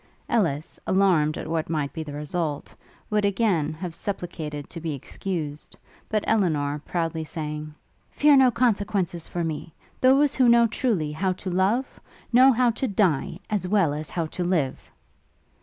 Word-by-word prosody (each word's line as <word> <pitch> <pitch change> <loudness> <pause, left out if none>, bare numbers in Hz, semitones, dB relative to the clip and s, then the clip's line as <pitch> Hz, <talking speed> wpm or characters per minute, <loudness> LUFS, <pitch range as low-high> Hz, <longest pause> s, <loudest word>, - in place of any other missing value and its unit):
Ellis, 165 -10 0
alarmed 180 -6 +3
at - - -5
what 160 -1 -2
might 150 -3 -1
be 160 - -4
the 150 -2 -7
result, 150 0 -3 0.4
would 210 0 +2
again 200 -6 +1
have 170 +1 -6
supplicated 160 -7 -5
to 170 - -6
be 160 -3 -3
excused; 150 +1 -6 0.3
but 215 -1 0
Elinor, 150 -9 +1
proudly 165 -2 -2
saying, 150 -1 -6 0.3
'Fear 295 -1 +5
no 260 -1 +6
consequences 205 -8 0
for 175 - -3
me! 160 0 -5 0.2
Those 270 +2 +4
who 255 -2 +4
know 235 0 +6
truly 215 - 0
how 185 +5 0
to 185 0 -6
love, 200 +9 0 0.3
know 260 +3 +7
how 245 -1 +3
to 260 +3 -2
die, 185 - +1
as 200 -4 -1
well 185 -7 +2
as 150 +1 -5
how 170 -2 -2
to 175 +3 -4
live!' 170 -7 -1
175 Hz, 155 wpm, -25 LUFS, 155-210 Hz, 0.4 s, know